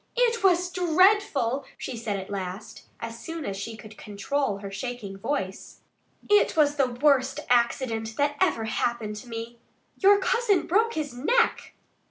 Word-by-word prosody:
"It 470 -2 +2
was 360 -1 +3
dreadful!" 355 - +2
she 255 - -5
said 225 -3 -3
at 190 +1 -8
last, 190 +1 -6 0.2
as 230 0 -6
soon 330 -2 -6
as 195 - -3
she 220 +3 -6
could 215 0 -13
control 210 +3 -2
her 200 0 -8
shaking 210 -1 -5
voice. 195 -3 -4 0.5
"It 415 -5 +3
was 295 -1 +3
the 270 -2 +3
worst 265 +1 +2
accident 235 -2 +1
that 290 0 +1
ever 325 -12 +2
happened 220 -1 -2
to 240 +3 -10
me.... 230 +1 -7 0.4
Your 400 +1 +6
cousin 425 -1 +1
broke 450 +6 +2
his 295 -4 -3
neck!" 455 - +1
255 Hz, 155 wpm, -26 LUFS, 220-350 Hz, 0.5 s, Your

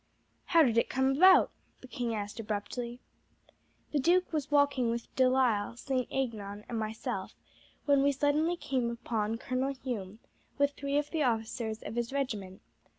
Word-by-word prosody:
"How 330 -2 +5
did 230 -4 +3
it - - 0
come 265 0 +2
about?" 370 +5 +7 0.3
the 255 - -11
king 240 -3 -3
asked 205 +2 -5
abruptly. 235 +3 -4 0.9
"The 295 - +1
duke 350 +5 +2
was 300 -2 -1
walking 285 -4 +3
with 235 0 -4
De 260 -1 +4
Lisle, 235 -4 +1
St. 255 0 -1
Aignan, 210 -6 -3
and 230 - -3
myself, 220 0 -4 0.5
when 285 -2 +4
we 285 +1 +4
suddenly 295 +5 +1
came 255 -7 -1
upon 225 -2 -2
Colonel 260 +3 -2
Hume 220 -7 -5 0.4
with 285 0 +3
three 280 0 -2
of 295 0 -1
the 320 - -1
officers 225 -2 -1
of - - -6
his 235 +1 -2
regiment. 215 -9 -3
255 Hz, 160 wpm, -31 LUFS, 225-280 Hz, 0.9 s, about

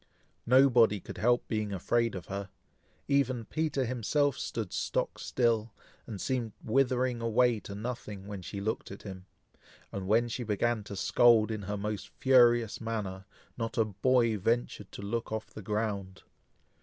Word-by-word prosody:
Nobody 120 -5 +5
could - - -9
help 120 +2 +2
being 110 -2 -2
afraid 115 +4 0
of 90 - -6
her. 100 0 -5 0.6
Even 135 -4 +1
Peter 150 -3 -1
himself 130 +4 +1
stood 110 -8 -4
stock - - -1
still, 115 -3 0 0.3
and 105 -4 -6
seemed 120 -4 -2
withering 125 0 +1
away 115 0 +3
to 100 - -8
nothing, 105 -3 -6
when 100 -2 -6
she 100 +3 -6
looked 110 +3 -3
at 100 - -10
him; 95 -2 -9 0.6
and 95 -1 -5
when 115 +4 +3
she 120 +2 -4
began 110 0 0
to 100 - -7
scold 115 +2 +4
in 110 -1 -3
her 105 +1 -4
most 105 0 -4
furious 120 -5 +4
manner, 100 -4 -4 0.3
not 115 -1 -3
a 115 - +4
boy 115 +2 +2
ventured 115 -1 -1
to - - -7
look 115 +3 -3
off 110 0 -4
the - - -8
ground. 100 -2 -3
110 Hz, 155 wpm, -30 LUFS, 100-120 Hz, 0.6 s, Nobody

